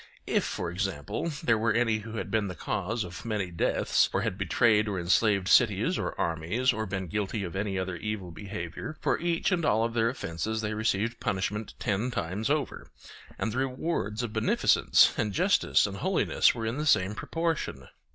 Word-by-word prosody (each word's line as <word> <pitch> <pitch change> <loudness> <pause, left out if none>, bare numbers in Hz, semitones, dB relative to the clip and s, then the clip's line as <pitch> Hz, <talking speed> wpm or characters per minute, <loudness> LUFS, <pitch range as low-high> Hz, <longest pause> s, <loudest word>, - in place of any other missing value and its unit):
If, - - +1
for 85 - -3
example, 95 - -3
there 115 -2 +3
were 115 0 +2
any 115 -2 +2
who 110 +1 -7
had - - -4
been 110 -2 +1
the 90 - -6
cause 110 +7 -2
of 90 -1 -8
many 105 -5 -2
deaths, 85 - +2
or - - 0
had - - -1
betrayed 110 -2 +3
or 100 -3 -2
enslaved 95 +2 +2
cities 110 - +4
or - - -4
armies, 85 +10 0
or 110 0 -3
been 95 0 -3
guilty 105 +3 -2
of 90 -1 -6
any 100 0 -2
other 95 -1 -2
evil 100 -1 -4
behaviour, 95 - -6
for - - 0
each 170 +2 0
and 175 -2 +1
all 110 -6 +3
of 115 0 -1
their 115 0 +2
offences 110 0 -3
they 110 0 -2
received 110 +2 -1
punishment 105 -1 -2
ten 105 +5 -1
times 105 -1 -2
over, 150 -1 -1 0.5
and 110 - -1
the 130 - -1
rewards 130 - -2
of 115 -3 -4
beneficence - - +4
and 105 -3 0
justice - - +3
and - - -4
holiness - - +2
were 115 -2 -4
in 115 +4 -2
the 155 - -1
same 95 -7 +3
proportion. 160 - -3
105 Hz, 190 wpm, -28 LUFS, 95-115 Hz, 0.5 s, cities